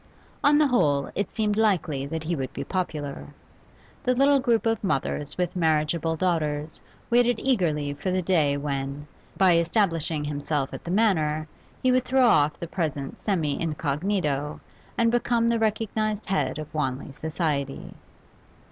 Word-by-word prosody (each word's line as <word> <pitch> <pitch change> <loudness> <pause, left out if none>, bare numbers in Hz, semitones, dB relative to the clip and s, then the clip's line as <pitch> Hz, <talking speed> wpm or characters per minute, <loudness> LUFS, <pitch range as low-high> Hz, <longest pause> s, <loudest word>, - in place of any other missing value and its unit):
On 295 +1 +5
the 305 - +5
whole 145 - +2
it 200 - -2
seemed 210 -2 -1
likely 170 -11 +1
that 160 +2 -4
he 170 +2 -1
would 135 -3 -4
be 140 - -4
popular. 150 -5 -4 0.7
The 250 -2 +1
little 275 +2 +4
group 235 -4 +1
of 225 -2 0
mothers 150 -4 -1
with 180 -1 -1
marriageable 160 -1 +1
daughters 155 -3 -1 0.3
waited 240 -1 +3
eagerly 155 - 0
for 145 +6 -4
the 185 0 0
day 155 -6 +2
when, 140 0 -3 0.3
by 185 -3 +5
establishing 165 -4 +1
himself 145 -1 -2
at - - -7
the - - -7
Manor, 160 -7 +1 0.4
he 255 - +4
would 255 0 +2
throw 260 0 +3
off 150 -10 +3
the - - -4
present 150 -6 -3
semi 160 -9 -1
incognito, 150 -1 -1 0.4
and 230 -1 +3
become 235 -1 +1
the 230 0 +2
recognised 215 -1 -1
head 190 -4 -1
of 155 0 -7
Wanley 135 -2 -2
society. 150 -3 -3
165 Hz, 150 wpm, -25 LUFS, 150-215 Hz, 0.7 s, On